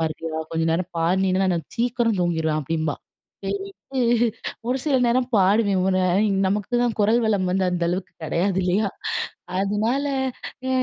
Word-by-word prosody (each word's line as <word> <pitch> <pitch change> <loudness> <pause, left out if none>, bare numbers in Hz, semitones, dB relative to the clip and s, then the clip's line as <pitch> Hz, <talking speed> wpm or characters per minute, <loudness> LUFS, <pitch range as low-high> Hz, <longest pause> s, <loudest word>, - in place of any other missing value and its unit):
பாடுறியா, 160 0 -3
கொஞ்ச 165 0 -1
நேரம் 170 +2 -1
பாடுனினா, 185 +3 +2
நான் 185 - +2
நான் 165 - -4
சீக்கிரம் 235 -2 +1
தூங்கிருவேன் 160 -3 +1
அப்படிம்பா. 155 +1 -1 0.5
செரிண்டு, 390 -9 -4 0.7
ஒரு 255 +2 +1
சில 295 -3 +1
நேரம் 245 +1 +2
பாடுவேன். 200 0 +3
ஒ - - +3
ந - - +2 0.5
நமக்குதான் 225 +4 0
குரல்வளம் 215 -3 +2
வந்து 190 +1 +1
அந்த 175 -1 0
அளவுக்கு 185 +1 -3
கிடையாது 180 +4 0
இல்லயா? 190 +4 +1 0.7
அதனால, 215 +8 0 0.6
அ - - 0
195 Hz, 140 wpm, -23 LUFS, 175-230 Hz, 0.7 s, பாடுவேன்